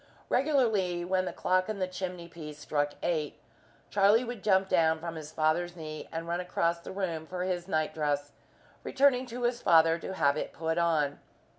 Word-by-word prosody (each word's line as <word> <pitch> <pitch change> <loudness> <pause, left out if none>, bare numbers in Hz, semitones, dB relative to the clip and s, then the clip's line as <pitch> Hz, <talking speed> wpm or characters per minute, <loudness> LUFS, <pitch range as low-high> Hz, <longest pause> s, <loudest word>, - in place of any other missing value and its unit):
Regularly, 220 - +2
when 185 +1 +1
the - - -3
clock 185 +2 +1
on 215 - -2
the 185 -1 -1
chimney 180 -2 -5
piece 155 -3 -9
struck 145 -1 -1
eight, 155 -4 -1 0.5
Charlie 205 +4 +5
would 240 -4 -6
jump 190 -2 +3
down 165 -3 +3
from 165 0 -5
his 155 -2 -8
father's 165 +3 0
knee 155 -2 -7
and 165 +1 -4
run 170 +1 -1
across 170 -1 0
the 170 - -9
room 170 -5 -3
for 180 +1 -3
his 180 -1 -2
night 155 -4 0
dress, 145 -2 -1 0.5
returning 260 -2 +3
to 245 +1 -6
his 240 0 0
father 165 0 +5
to 190 - -6
have 140 -4 +2
it - - -4
put 160 +1 -1
on. 155 -4 +1
175 Hz, 185 wpm, -30 LUFS, 160-190 Hz, 0.5 s, Charlie